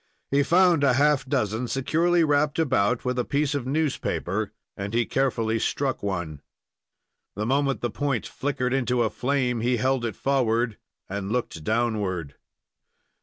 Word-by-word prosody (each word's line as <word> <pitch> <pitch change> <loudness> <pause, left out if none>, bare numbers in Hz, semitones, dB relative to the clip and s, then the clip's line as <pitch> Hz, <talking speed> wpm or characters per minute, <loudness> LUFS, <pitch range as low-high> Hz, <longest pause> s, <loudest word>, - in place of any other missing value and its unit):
He 140 +1 +4
found 170 0 +4
a 135 -3 +4
half 145 +1 +3
dozen 120 -3 -1
securely 165 +7 +2
wrapped 145 0 +2
about 125 -7 +1
with 125 0 0
a - - +2
piece 145 +2 0
of 135 -3 -3
newspaper, 120 - -1 0.2
and 100 +2 -4
he 120 0 +2
carefully 115 -4 0
struck 135 +3 -1
one. 85 -7 -3 0.9
The 105 +2 -2
moment 135 +2 +1
the 120 - -1
point 140 -3 -1
flickered 130 -3 -2
into 125 -2 +1
a 110 - 0
flame 125 -3 0
he 120 +1 +1
held 130 +2 +1
it 115 -2 -2
forward 120 -4 0 0.3
and 100 +1 -4
looked 115 -9 -2
downward. 105 -8 -1
125 Hz, 150 wpm, -25 LUFS, 110-140 Hz, 0.9 s, He